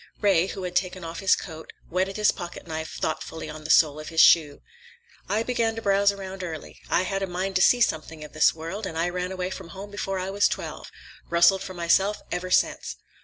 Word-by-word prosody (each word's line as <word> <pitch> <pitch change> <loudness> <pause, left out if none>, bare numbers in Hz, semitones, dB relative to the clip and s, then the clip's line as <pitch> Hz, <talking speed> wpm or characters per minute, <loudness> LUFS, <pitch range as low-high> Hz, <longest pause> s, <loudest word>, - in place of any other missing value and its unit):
Ray, 190 -4 +3
who 195 - -6
had 180 0 -5
taken 185 -1 -1
off 165 0 -6
his 195 - +4
coat, 160 -3 -9
whetted 190 +3 -1
his 210 -1 +4
pocketknife 160 -2 -7
thoughtfully 160 +1 -4
on 155 0 -10
the - - -6
sole 155 -2 +5
of 155 - -7
his 165 -1 -2
shoe. 150 -4 +5 0.7
"I 215 +2 +1
began 230 -2 0
to 225 - -5
browse 200 0 +4
around 190 -1 -7
early. 160 -3 -7
I 180 - +2
had 195 +1 -2
a 195 - -1
mind 185 +2 -3
to - - +1
see 245 +6 +5
something 160 -6 0
of 150 - -11
this 155 -1 +5
world, 165 +6 -6
and 160 - -6
I 170 +2 +1
ran 180 +1 -3
away 185 0 -3
from 180 - -7
home 195 +4 -9
before 195 -1 -3
I 185 +1 -3
was 200 +1 +3
twelve. - - -5 0.4
Rustled 170 +3 +5
for 185 - -7
myself 190 +4 +2
ever 180 +1 -3
since." - - +1
185 Hz, 220 wpm, -25 LUFS, 165-195 Hz, 0.7 s, sole